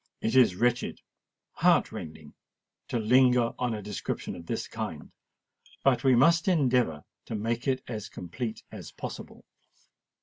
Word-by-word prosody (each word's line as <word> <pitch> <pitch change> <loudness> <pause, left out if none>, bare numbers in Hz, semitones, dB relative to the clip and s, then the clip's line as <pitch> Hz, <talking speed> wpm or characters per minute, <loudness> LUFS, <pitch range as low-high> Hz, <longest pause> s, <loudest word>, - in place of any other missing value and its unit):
It 115 - -1
is 125 -8 +6
wretched—heart 120 +4 0
rending 75 -1 -9 0.5
to - - -1
linger 125 +1 +4
on 125 -3 0
a 105 - -6
description 105 -1 -4
of 85 -1 -11
this - - -3
kind: - - -6 0.7
but 135 -1 +3
we 130 -2 +5
must 170 +8 +4
endeavour 125 - +2 0.2
to 115 - -5
make 115 +4 -2
it 130 -1 0
as 110 -3 -5
complete 110 +6 -6
as - - -9
possible. - - -8
120 Hz, 135 wpm, -28 LUFS, 105-130 Hz, 0.7 s, is